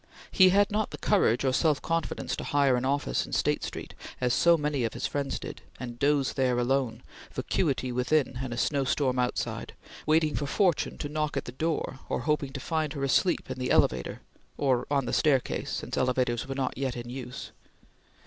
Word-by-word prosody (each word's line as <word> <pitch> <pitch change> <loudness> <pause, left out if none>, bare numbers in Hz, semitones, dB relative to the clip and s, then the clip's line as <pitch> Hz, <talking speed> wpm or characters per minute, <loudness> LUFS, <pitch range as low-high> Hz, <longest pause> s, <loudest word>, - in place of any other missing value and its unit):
He 185 -1 +7
had 200 +2 +3
not 215 +1 0
the - - -7
courage 135 - +2
or 130 - +2
self 155 0 +2
confidence 165 -1 -2
to - - -4
hire 140 -3 +3
an 125 +1 -1
office 140 +2 0
in - - -9
State - - +1
Street, - - -6 0.3
as 125 -1 +1
so 170 0 +5
many 150 -4 -1
of 115 - -2
his - - -3
friends 140 -1 -2
did, - - -8 0.2
and 120 -1 -7
doze 140 -1 +2
there 130 -2 +1
alone, 125 -1 0 0.3
vacuity 135 -6 -1
within 125 +1 +1
and 130 -2 -4
a 120 - -4
snowstorm 135 -1 +1
outside, 125 0 -2 0.3
waiting 155 -1 +3
for 145 - -2
Fortune 180 +1 +1
to - - -4
knock 150 -1 -2
at 135 - -2
the - - -6
door, 150 -1 -2
or - - -1
hoping 150 0 0
to 140 - -4
find 155 0 -1
her 140 -3 -4
asleep 170 +6 +2
in 130 - -5
the 125 - -2
elevator; 65 -1 +2 0.4
or 130 -4 +1
on 140 -2 +1
the 120 - -3
staircase, 140 -5 +1
since - - -4
elevators 125 -2 +1
were 135 - -4
not 130 -1 -2
yet 135 -2 -1
in 120 0 -6
use. 125 -1 -7
135 Hz, 195 wpm, -28 LUFS, 125-150 Hz, 0.4 s, He